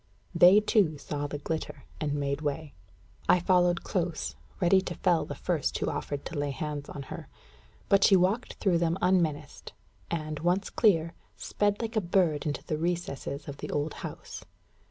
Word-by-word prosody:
They, 185 +4 +8
too, 205 -7 +2
saw 145 +1 -4
the 145 - -5
glitter, 160 +2 -4 0.2
and 145 -2 -1
made 140 0 -1
way. 150 0 -3 0.6
I 180 - +6
followed 175 -1 +3
close, 165 - -2 0.2
ready 190 +2 +4
to 175 - -5
fell 175 -2 +2
the - - -6
first - - -1
who - - -1
offered 145 -1 -4
to 155 - -4
lay 145 0 -1
hands 145 0 -4
on 140 - -6
her. - - -8 0.6
But 195 0 +4
she 195 - +7
walked 190 +7 +1
through 180 -4 +1
them 170 +1 +1
unmenaced, 175 -5 0 0.4
and, 155 -2 -3
once 180 +4 0
clear, 170 -7 +3 0.2
sped 205 +2 0
like 225 +1 -4
a 215 - +3
bird 170 -5 +1
into 145 - -3
the 155 - -3
recesses 165 -4 -3
of 140 -1 -6
the - - -6
old 150 +1 -1
house. - - -7
165 Hz, 175 wpm, -29 LUFS, 145-185 Hz, 0.6 s, They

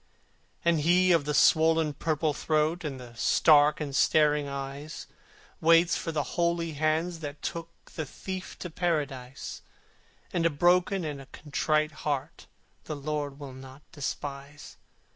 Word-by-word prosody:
And 170 -2 +3
he 180 +4 +4
of 165 -4 +3
the 150 - -1
swollen 160 -1 +4
purple 155 0 0
throat, 155 +4 0
And 140 -4 -4
the 120 -2 -11
stark 150 +5 +4
and 145 -3 -4
staring 150 0 +3
eyes, 140 +2 -6 0.5
Waits 165 +1 +5
for 165 - -3
the 150 -2 -1
holy 170 +1 -1
hands 155 +3 0
that 145 -2 -7
took 170 0 -4 0.2
The 155 -3 -4
Thief 185 +5 -7
to 180 - -5
Paradise; 145 -7 -3 0.7
And 170 - +1
a 165 - +4
broken 175 +4 +2
and 145 -2 -5
a 135 - -13
contrite 155 +1 -1
heart 140 -3 -3 0.4
The 155 - -4
Lord 145 -1 -4
will 140 -3 -8
not 130 +2 -12
despise. 145 0 -6
155 Hz, 140 wpm, -28 LUFS, 145-165 Hz, 0.7 s, Waits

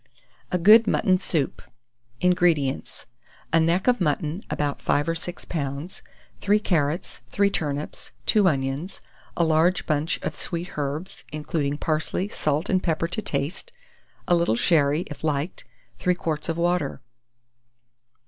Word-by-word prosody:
A 180 - +2
GOOD 215 +6 +7
MUTTON 185 -2 +3
SOUP. 155 -7 -1 0.6
175. 180 - +5
INGREDIENTS. 160 -7 0 0.5
A 165 - +6
neck 170 +3 +2
of 245 -4 +3
mutton 155 +2 0
about 145 -1 -2
5 145 +2 +1
or - - +2
6 175 +2 -6
lbs., 145 +2 -4 0.4
3 205 +1 +3
carrots, 165 -3 -1
3 200 0 +2
turnips, 145 -4 -3
2 210 -3 +4
onions, 140 +3 -1 0.4
a 170 - +3
large 165 +3 +3
bunch 155 +1 0
of - - -3
sweet 175 +1 -4
herbs, 150 +5 -4
including 150 -1 -2
parsley; 160 +5 -1
salt 150 -7 -1
and 185 -1 +2
pepper 165 -1 0
to 215 - -2
taste; 145 -3 -3 0.6
a - - +3
little 170 -9 +3
sherry, 150 +3 +3
if 145 -4 -9
liked; 150 +2 -2 0.3
3 180 0 +2
quarts 160 -2 -3
of 165 - -1
water. 175 -5 0
165 Hz, 140 wpm, -25 LUFS, 145-180 Hz, 0.6 s, GOOD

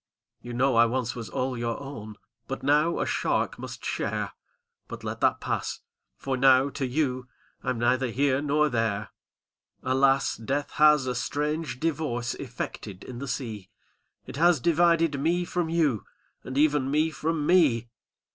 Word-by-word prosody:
"You 120 - -7
know 130 0 +2
I 120 0 +6
once 120 0 -1
was 115 -2 -7
all 130 0 -2
your 115 -1 -2
own. 115 -7 -8 0.3
But 135 - -5
now 150 +4 +3
a - - 0
shark - - -1
must - - -8
share! - - -2 0.6
But - - -8
let - - -5
that - - +3
pass - - -2 0.4
â - - -28
^for 135 -1 -1
now 135 +1 +5
to 135 -1 -2
you 130 -2 -1 0.3
I'm 130 - -2
neither 125 +2 +1
here 135 +3 +1
nor 150 +1 +2
there. 110 -5 -1 0.7
''Alas! 135 +1 +2
death 140 +4 -2
has 150 -3 +6
a 125 - -1
strange 145 +2 -2
divorce 145 -7 -1
Effected 110 -5 -7
in 125 -2 -8
the 140 - -5
sea. 110 -8 -5 0.6
It - - -8
has 170 -1 +4
divided 165 -1 +3
me 175 +4 +1
from 175 -2 -2
you, 155 - +1 0.4
And 130 - -6
even 145 -2 +3
me 155 +3 +2
from 155 -1 -2
me! 145 -10 +3
135 Hz, 160 wpm, -27 LUFS, 120-150 Hz, 0.7 s, I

